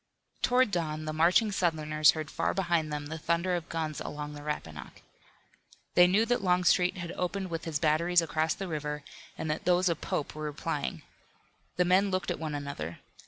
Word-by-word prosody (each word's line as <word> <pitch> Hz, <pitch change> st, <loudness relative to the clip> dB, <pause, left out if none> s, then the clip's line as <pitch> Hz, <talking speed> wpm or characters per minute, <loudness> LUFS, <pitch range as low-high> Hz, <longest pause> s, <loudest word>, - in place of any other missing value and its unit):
Toward 250 Hz, -2 st, +3 dB
dawn 155 Hz, -3 st, -2 dB
the 155 Hz, -, -3 dB
marching 180 Hz, +7 st, +4 dB
Southerners 155 Hz, -5 st, +3 dB
heard 155 Hz, -1 st, -5 dB
far -, -, -1 dB
behind 170 Hz, -5 st, 0 dB
them 150 Hz, -1 st, -3 dB
the 160 Hz, +2 st, -6 dB
thunder 170 Hz, +3 st, 0 dB
of 175 Hz, -2 st, -3 dB
guns 160 Hz, -2 st, -3 dB
along 150 Hz, 0 st, -5 dB
the 145 Hz, -, -8 dB
Rappahannock. 80 Hz, -, -6 dB, 0.9 s
They 175 Hz, 0 st, +7 dB
knew 205 Hz, +5 st, +3 dB
that 245 Hz, -3 st, 0 dB
Longstreet 180 Hz, 0 st, +3 dB
had 175 Hz, -1 st, -5 dB
opened 185 Hz, +1 st, -3 dB
with 165 Hz, 0 st, -4 dB
his 160 Hz, -3 st, -1 dB
batteries 165 Hz, +3 st, +3 dB
across 155 Hz, 0 st, 0 dB
the 195 Hz, -, -5 dB
river, 150 Hz, -2 st, -4 dB, 0.3 s
and 160 Hz, -, -4 dB
that 150 Hz, -, -4 dB
those 180 Hz, +1 st, +3 dB
of 170 Hz, -1 st, -2 dB
Pope 145 Hz, -, -2 dB
were 155 Hz, -, -8 dB
replying. 140 Hz, -, -3 dB, 0.7 s
The 180 Hz, -, +2 dB
men 190 Hz, +3 st, +4 dB
looked 185 Hz, -1 st, -1 dB
at -, -, -3 dB
one 155 Hz, -2 st, -3 dB
another. 140 Hz, -, -5 dB
165 Hz, 185 wpm, -29 LUFS, 150-180 Hz, 0.9 s, They